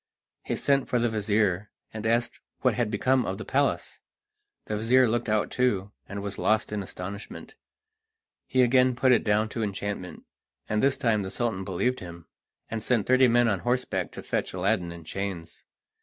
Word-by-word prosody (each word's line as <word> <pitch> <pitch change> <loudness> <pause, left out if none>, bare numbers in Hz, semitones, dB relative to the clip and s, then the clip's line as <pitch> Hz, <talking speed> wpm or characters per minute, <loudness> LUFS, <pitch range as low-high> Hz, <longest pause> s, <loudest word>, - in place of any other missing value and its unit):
He - - -3
sent 140 -2 +1
for 125 - +2
the 120 0 +2
vizir, 105 -3 0 0.2
and 110 0 -3
asked 115 +1 0 0.2
what 130 -3 +3
had 120 -1 0
become 125 +5 +2
of 95 - -3
the 110 - -7
palace. 140 +1 0 0.6
The 105 - -2
vizir 125 +4 +4
looked 120 +1 -1
out 105 0 +1
too, 105 -6 0 0.2
and 100 0 -5
was 100 0 -5
lost 110 0 +1
in 105 -1 -2
astonishment. 95 +2 -8 0.9
He 130 -1 +3
again 125 0 +4
put 130 +1 +3
it 125 - +4
down 105 +1 +2
to 115 - -4
enchantment, 100 -2 -4 0.4
and 105 0 0
this 135 -1 +3
time 115 -6 +1
the 95 - -4
Sultan 105 -1 -2
believed 100 +8 -1
him, 85 -2 -10 0.4
and 115 0 -4
sent 115 -2 +1
thirty 130 0 +5
men 120 0 +4
on 100 -4 +1
horseback 125 +5 -1
to - - -8
fetch - - -2
Aladdin 90 -1 0
in 85 -1 -10
chains. 90 -2 -6
110 Hz, 180 wpm, -27 LUFS, 100-125 Hz, 0.9 s, thirty